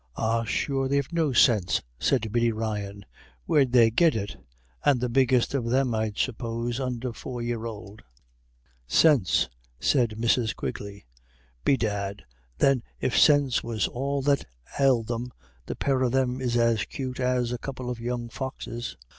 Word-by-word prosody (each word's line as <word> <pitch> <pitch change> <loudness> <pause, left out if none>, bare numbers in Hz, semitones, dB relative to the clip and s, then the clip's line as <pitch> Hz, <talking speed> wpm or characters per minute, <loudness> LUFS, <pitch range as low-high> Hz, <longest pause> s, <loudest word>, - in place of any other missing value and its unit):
"Ah, 115 +1 0
sure 135 +3 -1
they've 140 +3 -1
no 160 -4 +1
sinse," 110 -7 +3 0.2
said 115 -6 +1
Biddy 120 0 +2
Ryan. 105 -3 -4 0.4
"Where'd 135 - +3
they 115 -3 +6
git 165 +5 +4
it? 100 -2 -3 0.5
And 140 -4 +4
the 125 0 -1
biggest 125 0 +2
of 135 -4 -1
them, 130 0 +2
I'd 110 -1 -2
suppose, 115 0 -2
under 125 -2 -3
four 125 +1 -7
year 120 -1 -3
ould." 105 -1 -9 0.9
"Sinse!" 135 - +4 0.3
said 120 -5 +2
Mrs. 115 0 +1
Quigley. 100 -5 -6 0.6
"Bedad, 100 -6 0 0.3
then, 135 -3 +3 0.2
if 125 - -1
sinse 145 -4 +4
was 115 -3 -1
all 140 +2 -2
that 140 0 +2 0.4
ailed 130 -5 +3
them, 120 +2 -4 0.4
the - - -4
pair 135 -2 0
of 125 -2 +2
them 130 -1 +1
is 120 -2 0
as 115 -2 +2
'cute 130 -4 -5
as 125 -1 +1
a 125 - -3
couple 130 -1 -6
of 125 -1 -4
young 120 0 -3
foxes. 120 - -6
120 Hz, 155 wpm, -26 LUFS, 115-130 Hz, 0.9 s, they